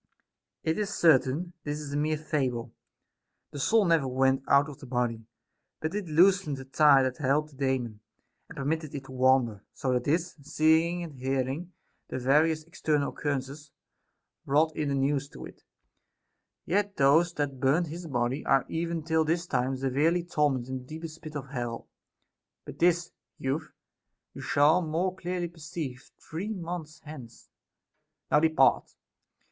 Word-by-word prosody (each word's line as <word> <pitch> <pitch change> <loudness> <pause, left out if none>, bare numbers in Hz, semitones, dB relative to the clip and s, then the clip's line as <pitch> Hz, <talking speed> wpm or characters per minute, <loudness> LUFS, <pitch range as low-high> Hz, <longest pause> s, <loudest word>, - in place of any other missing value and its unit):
It 160 +4 0
is 205 -1 -1
certain, 160 +2 +3
this 145 0 -3
is 145 -2 -6
a - - -2
mere 155 +1 +1
fable. 130 -6 -2 0.8
The 145 - -7
soul 220 +9 +3
never 165 -5 +3
went 130 +1 +2
out 140 +1 +5
of 145 - -10
the 135 - -11
body, 120 -3 -2 0.5
but 155 +1 -3
it 205 -3 -3
loosened 175 -1 +3
the 135 - -8
tie 140 0 +5
that 130 -1 -2
held 150 +1 +1
the 145 - -19
Daemon, 130 -5 -1 0.5
and - - -11
permitted 150 +2 -2
it 140 - -5
to 130 - -13
wander; 130 -5 +2
so 130 -1 -1
that 125 -1 0
this, 165 +4 0
seeing 160 +4 +2
and 150 -6 -9
hearing 135 +7 -2 0.3
the - - -4
various 155 +5 +2
external 155 -3 -1
occurrences, 145 +1 -4 0.7
brought 155 +3 +2
in 150 -2 -1
the 140 - 0
news 140 +1 0
to - - -10
it; - - -14 1.0
yet 200 +2 0
those 155 +5 +4
that 140 -3 -2
burnt 140 +6 +2
his 170 +2 -7
body 125 +1 -1
are 135 -2 +3
even 165 0 -2
till 160 0 +2
this 165 +3 0
time 130 -4 -1
severely 145 +7 +1
tormented 145 -7 0
in 130 - -2
the - - -12
deepest 160 +2 -8
pit 155 -1 -9
of 140 -2 -5
hell. 120 -4 -4 0.8
But - - -10
this, 175 0 +2 0.3
youth, 140 +4 -3 0.6
you - - -8
shall 150 +5 +4
more 175 +3 -1
clearly 180 -1 -3
perceive 155 -5 -7
three 175 +7 -6
months 170 -4 -6
hence; 130 -6 -11 0.8
now 150 - +6
depart. 160 -3 +3
150 Hz, 160 wpm, -28 LUFS, 135-165 Hz, 1.0 s, now